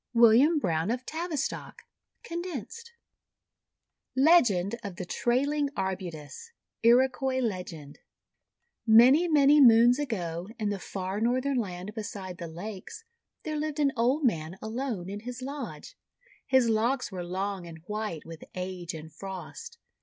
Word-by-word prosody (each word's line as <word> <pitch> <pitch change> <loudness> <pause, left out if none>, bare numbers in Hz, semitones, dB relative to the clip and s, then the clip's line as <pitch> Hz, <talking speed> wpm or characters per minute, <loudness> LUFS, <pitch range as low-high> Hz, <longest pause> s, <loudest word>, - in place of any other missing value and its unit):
WILLIAM 235 +8 +6
BROWNE 165 - 0
OF 250 +2 -2
TAVISTOCK 320 -3 -4 0.4
(condensed) 345 - -6 1.2
LEGEND 245 - +4
OF 200 -4 -6
THE 185 -1 -5
TRAILING 280 +8 0
ARBUTUS 185 - -5 0.3
Iroquois 260 +2 +3
Legend 180 - -4 0.9
MANY, 255 +10 +7
many 295 -2 +5
Moons 240 +1 +7
ago, 180 - -3
in 215 -3 -1
the 205 -1 -2
far 190 +2 -4
Northern 255 +3 +1
Land 185 -1 -5
beside 195 -4 -6
the 170 - -5
Lakes, 190 - -8 0.4
there 310 -1 -3
lived 305 0 -3
an 285 -2 +3
old 255 +6 +1
man 165 -5 -1
alone 220 -4 -4
in 200 +2 -5
his 245 +3 -7
lodge. 285 - -7 0.5
His 260 -3 +4
locks 230 +3 +1
were 180 -2 -5
long, 190 +1 -3
and 165 -1 -9
white 210 -6 -4
with 165 -1 -10
Age 180 -2 -5
and 160 0 -10
Frost. 195 - -8
225 Hz, 130 wpm, -28 LUFS, 185-275 Hz, 1.2 s, MANY